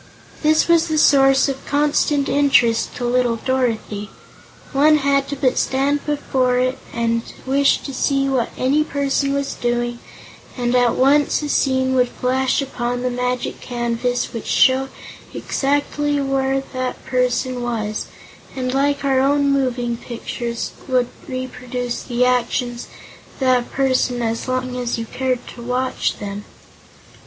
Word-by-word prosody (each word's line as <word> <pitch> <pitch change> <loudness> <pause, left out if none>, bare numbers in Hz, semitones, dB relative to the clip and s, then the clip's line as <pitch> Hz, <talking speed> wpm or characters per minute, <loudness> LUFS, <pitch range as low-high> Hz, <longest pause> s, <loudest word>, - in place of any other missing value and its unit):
This 310 0 +3
was 335 -1 +4
the 315 -1 -1
source 270 -2 +5
of 270 -1 -4
constant 290 0 +1
interest 270 -5 +2
to 245 - -3
little 245 -1 +2
Dorothy. 230 -4 -2 0.6
One 300 +3 +5
had 275 -1 +2
but 285 -1 -4
to - - -12
stand 280 +2 0
before 260 -4 +1
it 255 +1 0
and 230 0 0 0.2
wish 275 +1 +3
to 275 - -7
see 275 +1 +1
what 260 -4 0
any 280 +4 +2
person 280 -1 0
was 280 0 -1
doing, 240 0 -2 0.6
and 245 -1 0
at 245 -1 +3
once 285 +3 +3
a 295 - -3
scene 260 -2 +1
would 250 -1 +3
flash 260 +3 0
upon 245 -2 -3
the 250 - 0
magic 250 0 -2
canvas 240 0 -2
which 230 - -6
showed 265 0 +3 0.5
exactly 290 +1 0
where 270 -1 0
that 255 -1 -4
person 250 0 0
was, 215 -3 -3 0.5
and 255 -1 -2
like 280 +1 +1
our 265 -1 +3
own 280 +1 +3
moving 245 -3 0
pictures 235 0 -5 0.2
would 250 -2 +1 0.2
reproduce 250 -1 -4
the 245 0 0
actions 245 -1 0 0.5
of - - -20
that 255 -2 +2
person 255 -2 +1
as 230 +2 -2
long 255 0 -2
as 245 -1 -2
you 230 - -4
cared 255 +1 -2
to 240 - -10
watch 250 +2 -1
them. 205 0 -6
255 Hz, 145 wpm, -20 LUFS, 245-275 Hz, 0.6 s, source